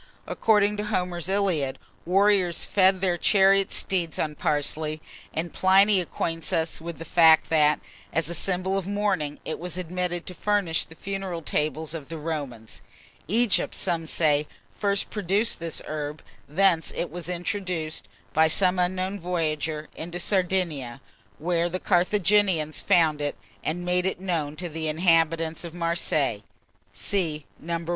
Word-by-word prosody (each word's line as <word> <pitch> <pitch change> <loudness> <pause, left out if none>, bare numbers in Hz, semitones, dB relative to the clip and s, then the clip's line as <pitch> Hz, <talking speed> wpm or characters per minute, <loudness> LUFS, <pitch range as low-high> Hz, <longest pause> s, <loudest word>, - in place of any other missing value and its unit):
According 210 -1 +2
to 210 - -2
Homer's 180 -4 -2
"Iliad," 170 -9 0 0.3
warriors 190 -2 +3
fed 190 -1 +3
their 180 -3 +1
chariot 195 0 +4
steeds 175 -4 0
on 155 -1 -1
parsley; 150 +1 -1 0.3
and 165 +2 -3
Pliny 195 +1 +5
acquaints 165 -1 -3
us 160 0 -1
with 170 0 -6
the 165 - -8
fact 160 -1 +5
that, 150 -1 +4 0.3
as 160 -2 0
a 170 - -3
symbol 190 +2 0
of 190 - -7
mourning, 200 -8 -1
it - - -4
was 175 0 -4
admitted 180 0 -3
to 180 - -6
furnish 200 -4 0
the 160 - -15
funeral 190 -3 -4
tables 155 +1 -1
of 155 -5 -7
the 165 - -5
Romans. 145 -8 -5 0.5
Egypt, 220 +2 +2
some 170 -3 0
say, 150 -2 +2 0.3
first 200 -1 -1
produced 205 +2 +1
this 165 -2 -4
herb; 150 0 -5 0.3
thence 170 +1 +2
it 175 - -3
was 175 0 -6
introduced, 175 -3 -3 0.3
by 160 +1 +5
some 180 +2 +3
unknown 185 +2 -1
voyager, 155 -3 -2
into 175 +2 -6
Sardinia, 175 - 0 0.4
where 170 +2 0
the 185 +2 -3
Carthaginians 185 -4 +2
found 160 -6 +3
it, 145 0 -2 0.3
and 175 +3 -2
made 180 +1 +2
it 190 - -2
known 165 -6 -2
to 175 +3 -4
the 160 -1 -4
inhabitants 165 0 +2
of 170 -1 -8
Marseilles. 165 -9 0 0.5
(See 160 -7 -1
No. 170 0 -4
170 Hz, 145 wpm, -25 LUFS, 155-190 Hz, 0.5 s, Pliny